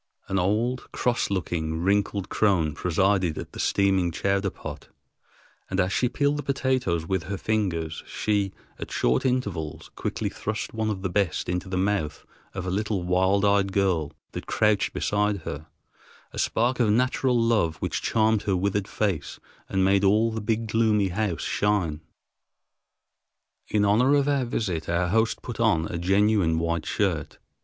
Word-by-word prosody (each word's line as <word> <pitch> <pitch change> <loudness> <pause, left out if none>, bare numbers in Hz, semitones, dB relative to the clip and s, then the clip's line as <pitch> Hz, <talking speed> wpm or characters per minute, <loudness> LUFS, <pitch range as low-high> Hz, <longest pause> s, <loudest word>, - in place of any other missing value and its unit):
An 95 - 0
old, 110 +7 0
cross 120 -1 0
looking, 80 -4 -2
wrinkled 100 0 +1
crone 90 -10 +2
presided 90 0 +1
at - - -6
the - - -10
steaming 95 -3 +2
chowder 100 +3 0
pot, - - -9 0.8
and 95 - -1
as 95 +1 +1
she 125 - +2
peeled 145 +2 +1
the - - -2
potatoes 130 - 0
with 95 -1 -1
her 100 +2 -3
fingers 90 -8 -1
she, 100 -2 0 0.3
at - - -6
short 65 - +1
intervals, 100 - -3
quickly - - -2
thrust 110 0 -4
one 110 -1 -1
of 95 -3 -3
the 95 - 0
best 95 -4 0
into 90 +2 -2
the 95 - -2
mouth 95 -5 -1 0.3
of 95 - -4
a 90 - -2
little 105 -1 -1
wild 95 +3 +2
eyed 100 -1 +3
girl 90 -6 +1 0.2
that - - -7
crouched 105 -2 +2
beside 105 -2 0
her, 75 +1 -6 0.6
a - - -6
spark 120 +3 +1
of 115 -3 +3
natural 125 +2 +2
love 110 -9 +2
which - - -3
charmed 110 -1 +2
her 100 -2 0
withered 100 +1 0
face 100 -7 -2 0.3
and 95 -1 +2
made 100 +1 +3
all 105 +4 +4
the 110 0 -4
big 110 +1 -1
gloomy 110 -3 +2
house 90 -3 -2
shine. 95 -7 0 1.7
In 105 -1 +2
honor 125 +8 +4
of 140 -1 +2
our 140 -3 +1
visit, 95 -10 -2
our 85 +1 +1
host 110 +3 +1
put 120 - -6
on 100 -9 +3
a 85 - -3
genuine 95 -2 +3
white 85 -1 -1
shirt. 90 -8 -1
100 Hz, 165 wpm, -26 LUFS, 90-110 Hz, 1.7 s, all